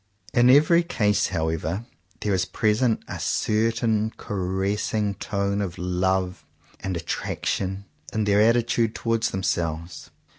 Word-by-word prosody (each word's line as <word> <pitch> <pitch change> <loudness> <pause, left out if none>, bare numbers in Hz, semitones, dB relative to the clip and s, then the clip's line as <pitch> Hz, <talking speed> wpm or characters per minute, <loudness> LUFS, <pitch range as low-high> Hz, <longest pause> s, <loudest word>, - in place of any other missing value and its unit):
In 120 0 +5
every 155 +6 +6
case 105 -11 +1
however 80 +4 -2 0.4
there 105 - 0
is 90 -1 +1
present 110 +4 +1
a - - -6
certain 110 0 +1
caressing 100 +2 -1
tone 100 0 -2
of 90 -3 -4
love 90 +1 -1 0.4
and 95 -2 -3
at 85 - -7
traction 95 +1 -2 0.3
in 110 - 0
their 105 0 +3
attitude 115 0 +2
towards 115 -1 0
them 95 0 -4
selves. 85 0 -2
100 Hz, 125 wpm, -24 LUFS, 95-110 Hz, 0.4 s, every